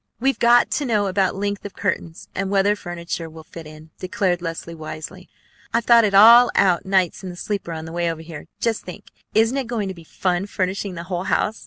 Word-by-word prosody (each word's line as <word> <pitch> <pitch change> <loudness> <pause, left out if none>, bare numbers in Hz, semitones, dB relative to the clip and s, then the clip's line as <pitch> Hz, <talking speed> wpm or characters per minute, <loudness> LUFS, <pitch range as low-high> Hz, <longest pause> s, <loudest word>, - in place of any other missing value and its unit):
"We've 270 +3 +1
got 240 +1 +4
to 290 - -1
know 210 -5 +1
about 190 -1 0
length 200 0 -3
of 200 - -8
curtains, 170 -4 -3
and 195 0 -2
whether 200 +1 +2
furniture 170 -3 -6
will 160 0 -12
fit 165 -1 -11
in," 155 +1 -14
declared 185 -1 -1
Leslie 165 0 -5
wisely. 155 -1 -8 0.5
"I've 230 0 +1
thought 235 -1 +6
it 200 -1 0
all 235 +4 +9
out 185 -2 +2
nights 190 -1 +1
in 185 - -5
the 175 - -8
sleeper 195 -1 -4
on 160 -1 -6
the 160 - -8
way 170 0 -1
over 160 -1 -7
here. 160 -2 -10
Just 230 -2 -1
think! 180 - -11 0.2
Isn't 225 +5 +3
it 265 -3 -2
going 220 -5 -2
to - - -4
be 170 -2 -14
fun 180 +3 -2
furnishing 190 0 -3
the 170 - -6
whole 180 0 -4
house? 215 +3 0
190 Hz, 220 wpm, -22 LUFS, 170-210 Hz, 0.5 s, all